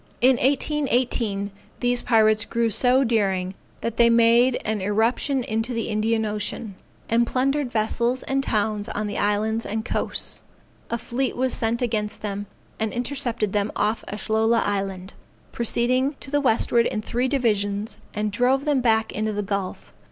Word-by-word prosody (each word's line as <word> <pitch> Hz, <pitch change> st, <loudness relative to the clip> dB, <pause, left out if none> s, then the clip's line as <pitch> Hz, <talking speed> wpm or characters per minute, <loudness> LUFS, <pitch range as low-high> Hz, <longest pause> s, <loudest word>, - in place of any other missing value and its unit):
In 255 Hz, +1 st, +5 dB
1818, 250 Hz, -7 st, 0 dB, 0.3 s
these 245 Hz, 0 st, +1 dB
pirates 215 Hz, -2 st, +3 dB
grew 230 Hz, +1 st, 0 dB
so 255 Hz, +5 st, +4 dB
daring 195 Hz, -6 st, 0 dB, 0.3 s
that 230 Hz, -1 st, -3 dB
they 235 Hz, 0 st, +6 dB
made 235 Hz, +2 st, +4 dB
an 215 Hz, -2 st, -1 dB
irruption 230 Hz, +7 st, +1 dB
into 225 Hz, +2 st, -2 dB
the 230 Hz, -, -2 dB
Indian 220 Hz, +1 st, 0 dB
Ocean, 210 Hz, 0 st, -4 dB, 0.3 s
and 235 Hz, +1 st, +2 dB
plundered 270 Hz, +1 st, 0 dB
vessels 235 Hz, +3 st, 0 dB
and 270 Hz, 0 st, 0 dB
towns 210 Hz, -4 st, -1 dB
on 210 Hz, -, -3 dB
the 205 Hz, 0 st, -3 dB
islands 215 Hz, +2 st, 0 dB
and 220 Hz, +2 st, -3 dB
coasts. -, -, -1 dB, 0.5 s
A 235 Hz, -, -1 dB
fleet 250 Hz, +3 st, -3 dB
was 260 Hz, +1 st, +1 dB
sent 230 Hz, +2 st, +1 dB
against 215 Hz, -3 st, -2 dB
them, 205 Hz, -1 st, -4 dB, 0.3 s
and 220 Hz, -1 st, -1 dB
intercepted 245 Hz, -4 st, -2 dB
them 205 Hz, 0 st, 0 dB
off 215 Hz, +2 st, 0 dB
Ashlola 220 Hz, +2 st, +1 dB
Island, 195 Hz, -2 st, -3 dB, 0.4 s
proceeding 255 Hz, +4 st, +2 dB
to 270 Hz, -, -7 dB
the 290 Hz, 0 st, +2 dB
westward 235 Hz, -2 st, +3 dB
in 215 Hz, -, -3 dB
three 245 Hz, +3 st, -1 dB
divisions; 210 Hz, -5 st, 0 dB, 0.2 s
and 210 Hz, 0 st, -1 dB
drove 255 Hz, +6 st, +1 dB
them 290 Hz, -3 st, +2 dB
back 220 Hz, -2 st, +2 dB
into 215 Hz, 0 st, -2 dB
the 205 Hz, 0 st, -2 dB
gulf. 195 Hz, -1 st, -4 dB
225 Hz, 155 wpm, -23 LUFS, 210-245 Hz, 0.5 s, they